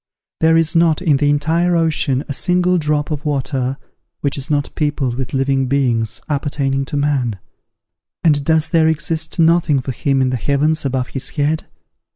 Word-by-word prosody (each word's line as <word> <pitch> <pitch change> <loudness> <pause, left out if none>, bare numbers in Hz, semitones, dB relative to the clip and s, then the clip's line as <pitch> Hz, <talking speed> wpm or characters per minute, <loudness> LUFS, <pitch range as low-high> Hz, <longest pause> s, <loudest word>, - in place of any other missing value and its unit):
There 160 0 +4
is 165 0 +1
not, 165 -2 +3
in 160 -6 +2
the 145 +1 +1
entire 165 +4 +1
ocean, 150 -5 +1
a 145 - -3
single 180 +3 +2
drop 150 -1 -1
of 150 -1 -3
water 135 -2 -2 0.4
which 140 -1 -1
is 140 -1 -6
not 145 -1 -1
peopled 145 -5 -1
with 125 0 -4
living 135 0 +1
beings 125 -5 0
appertaining 140 -2 -1
to 145 +1 -4
man: 135 -7 0 0.9
and 145 -3 +3
does 160 +1 +1
there 160 -1 +3
exist 160 +1 -2
nothing 165 -3 +3
for 130 +1 -4
him 135 +2 0
in 130 -1 +1
the 130 - -1
heavens 145 +4 0
above 130 -2 -1
his 135 -1 -4
head? 150 +1 -1
145 Hz, 175 wpm, -18 LUFS, 135-160 Hz, 0.9 s, There